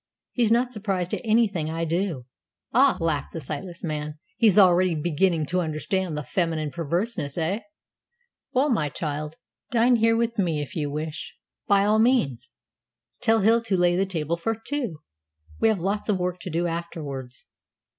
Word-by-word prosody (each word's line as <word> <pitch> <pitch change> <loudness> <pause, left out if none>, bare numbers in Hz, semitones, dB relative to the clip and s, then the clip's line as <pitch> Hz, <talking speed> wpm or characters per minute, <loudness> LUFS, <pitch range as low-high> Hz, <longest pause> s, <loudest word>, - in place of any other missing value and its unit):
He's 235 -3 +1
not 245 +2 +3
surprised 195 -5 -2
at - - -1
anything 215 -8 +2
I 165 +1 -2
do." 165 -5 -1 0.5
"Ah!" 265 +3 +5
laughed 160 -4 -1
the 165 - -4
sightless 165 +5 -7
man, 150 -2 -4 0.2
"he's 215 -4 +4
already 185 -2 +5
beginning 165 +1 +1
to 180 +5 0
understand 165 +1 -2
the 150 - -3
feminine 160 0 -1
perverseness, 170 - -2
eh? 175 +6 0 0.9
Well, 270 +3 +2
my 165 -10 +1
child, 150 +1 -4 0.3
dine 240 +1 +4
here 225 0 +3
with 230 -1 -1
me 165 -6 +1
if 145 - -6
you 150 -3 -1
wish, 155 +2 -5 0.3
by 200 0 +4
all 215 +1 +3
means. 145 - +2 0.7
Tell 225 -1 +3
Hill 225 +3 +4
to 205 -5 0
lay 175 0 +3
the 190 +2 +1
table 165 -2 -2
for 225 +7 -1
two. 225 - -4 0.6
We - - +4
have 220 -2 +3
lots 200 +5 -2
of 205 - +3
work 180 0 -2
to 185 - -6
do 170 +1 0
afterwards." 150 -7 -5
175 Hz, 165 wpm, -25 LUFS, 155-215 Hz, 0.9 s, Ah